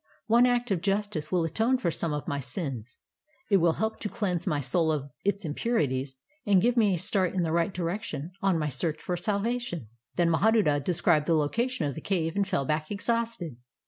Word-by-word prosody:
One 235 +3 +5
act 245 -2 +1
of 180 -4 +1
justice 195 -6 -1
will 180 -2 +2
atone 225 +10 +1
for 175 -9 0
some 165 0 -2
of 150 -1 -3
my 140 - -1
sins; 130 - -5 0.5
it 200 - +7
will 170 -2 +3
help 220 +4 -2
to 210 - -3
cleanse 195 -6 -2
my 150 -5 +1
soul 160 +5 +1
of 145 -2 -3
its 200 -1 0
impurities 145 - -1 0.3
and 200 -2 +4
give 240 +6 +2
me 210 -5 +4
a - - -2
start 185 +1 +1
in 180 - +1
the 160 - -1
right 170 +4 +1
direction 175 -2 -4
on 195 -3 +2
my 155 -2 -1
search 150 +3 -2
for 180 - -3
salvation." 200 - -2 0.3
Then 170 -1 +3
Mahaduta 170 -5 +3
described 170 -2 +2
the 165 - +4
location 210 - 0
of 140 - -1
the 160 - -7
cave 165 -3 -1
and 200 -1 +1
fell 140 - 0
back 155 +2 -1
exhausted. 215 - -2
175 Hz, 205 wpm, -28 LUFS, 155-210 Hz, 0.5 s, it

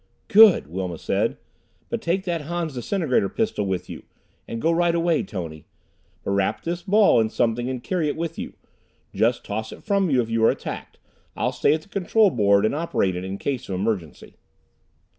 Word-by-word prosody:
"Good!" 220 -3 +7
Wilma 90 +1 -4
said. - - -1 0.5
"But - - -3
take 180 +3 0
that 170 -4 -2
Han's 165 0 -3
disintegrator 130 - 0
pistol 160 - -1
with 90 -1 -2
you. - - -8 0.5
And 115 - -5
go 165 +7 +2
right 170 0 +2
away, 170 -1 +2
Tony. 80 -6 -7 0.6
But - - -2
wrap 100 -1 0
this 170 +1 -3
ball 200 - +4
in 110 -1 +2
something 120 +2 0
and 130 -2 -4
carry 175 -5 -1
it 145 - -1
with 165 0 -4
you. - - -6 0.6
Just 120 +2 +1
toss 110 +2 -4
it - - -11
from 200 -3 +1
you 130 -3 +3
if 120 - 0
you 115 0 +1
are - - +6
attacked. - - -5 0.4
I'll - - 0
stay 145 - +2
at 155 - -6
the - - -21
control 200 +1 +3
board 100 -5 +3
and 110 - +1
operate 145 - 0
it 90 - -4
in 95 +1 -5
case 130 -2 -3
of 95 - -2
emergency." 95 -5 -4
130 Hz, 195 wpm, -23 LUFS, -, 0.6 s, Good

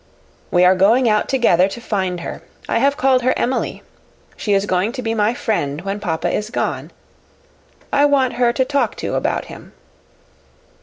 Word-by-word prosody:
We 180 0 +4
are 180 - +6
going 220 +7 +3
out 215 -1 +1
together 195 -9 +3
to 200 - -7
find 190 -6 -2
her. - - -7 0.3
I - - +1
have 280 +3 +2
called 260 -2 +3
her 255 +1 +1
Emily. 255 +2 -2 0.5
She 205 - -1
is 195 0 +2
going 190 +3 0
to 255 -2 -5
be 225 -1 -1
my 220 +1 +1
friend 150 -12 -2
when 195 +2 -4
papa 165 -6 -2
is 210 +1 -2
gone. 245 - -3 1.0
I 285 0 +4
want 270 -4 +2
her 240 0 +2
to 260 +2 0
talk 280 +1 0
to - - -4
about - - -1
him." - - -12
225 Hz, 175 wpm, -19 LUFS, 190-255 Hz, 1.0 s, are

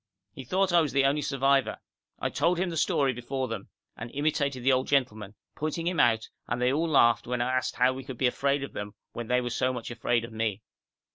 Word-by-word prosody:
He - - -9
thought 190 +6 +1
I 170 - +6
was 155 - -2
the 140 -1 +3
only 145 +2 +2
survivor. 135 -1 +1 0.4
I - - -2
told 170 +4 +1
him 180 0 -1
the - - -4
story 140 -3 +2
before 130 +2 -3
them, 115 - -6 0.3
and 115 - -7
imitated 140 -3 0
the 135 - +4
old 130 0 +1
gentleman, 110 -7 0 0.2
pointing 155 +2 -3
him 175 -1 0
out, 110 0 +3 0.2
and 120 - -2
they 125 +1 +2
all 160 +3 +1
laughed 120 -7 +4
when 125 0 -1
I 125 +2 0
asked 130 - -1
how 125 +1 +3
we 130 +1 -7
could 130 -2 -8
be 130 - +1
afraid 140 +2 +1
of 140 - -7
them 105 -1 -6 0.2
when 120 -1 -5
they 125 +1 +2
were 120 0 -3
so 130 +2 +1
much 125 -2 -6
afraid 120 -1 0
of 115 - -12
me. 110 -2 -2
130 Hz, 235 wpm, -28 LUFS, 120-140 Hz, 0.4 s, I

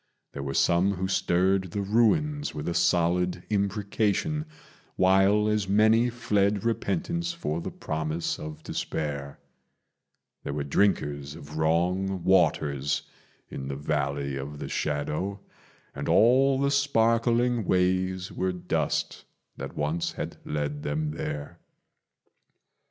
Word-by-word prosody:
There 70 - -5
were 70 0 -4
some 95 +4 +3
who 95 +1 -2
stirred 95 0 +1
the 100 +4 -3
ruins 145 - +1
with 75 - -4
a 85 - 0
solid 90 +1 +1
imprecation, 105 - 0 0.5
While 95 +3 +4
as 105 -3 0
many 110 +4 +4
fled 105 -4 +1
repentance 170 - -1
for 85 - -3
the - - -4
promise 80 +2 -3
of 75 0 -8
despair: 70 -3 -4 1.1
There - - -4
were 75 0 -2
drinkers 75 -3 0
of 75 +2 -10
wrong 90 +4 +1
waters 75 -6 +2 0.4
in 65 - -6
the 70 - -3
Valley 70 -1 -2
of 70 +2 -6
the - - -6
Shadow, 75 +7 -2 0.5
And - - -4
all 130 +4 +5
the 140 0 +2
sparkling 120 -3 +2
ways 95 0 +1
were 95 0 -1
dust 90 - -2 0.3
that - - -7
once 75 +3 -1
had - - -5
led 75 -1 -3
them 75 +1 -2
there. 75 -2 -5
95 Hz, 120 wpm, -27 LUFS, 75-105 Hz, 1.1 s, all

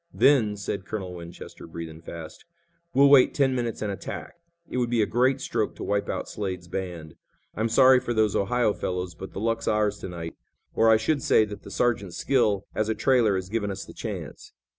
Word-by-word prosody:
"Then," 115 -8 +4
said 100 -1 -4
Colonel 95 -4 -4
Winchester, 85 -1 -10
breathing 80 -1 -8
fast, 85 -1 -9 0.5
"we'll 140 -1 +6
wait 135 -3 +6
ten 135 -2 +3
minutes 120 -3 -2
and 105 - -1
attack. 100 - -6 0.3
It - - -4
would 120 -1 +1
be 115 -2 +2
a - - +2
great 130 +6 +2
stroke 115 -4 -1
to - - -7
wipe 100 0 -1
out - - -3
Slade's 95 -4 -5
band. 85 -4 -5 0.4
I'm 110 +2 -1
sorry 130 +2 +6
for 120 - -4
those 110 -3 +2
Ohio 110 +2 +2
fellows, 90 -2 -3
but 95 +5 -9
the - - -5
luck's 115 +1 -1
ours 105 -1 +1
to - - -6
night, 85 -2 -6 0.4
or 115 - +4
I 110 - +7
should 140 +6 0
say 110 - +4
that 105 -1 -8
the - - -11
sergeant's 100 -4 0
skill 105 -7 +1
as 110 0 -1
a 110 - 0
trailer 115 -3 +3
has 95 -1 -3
given 105 0 -2
us 95 0 -5
the - - -12
chance." - - -7
105 Hz, 205 wpm, -26 LUFS, 95-120 Hz, 0.5 s, I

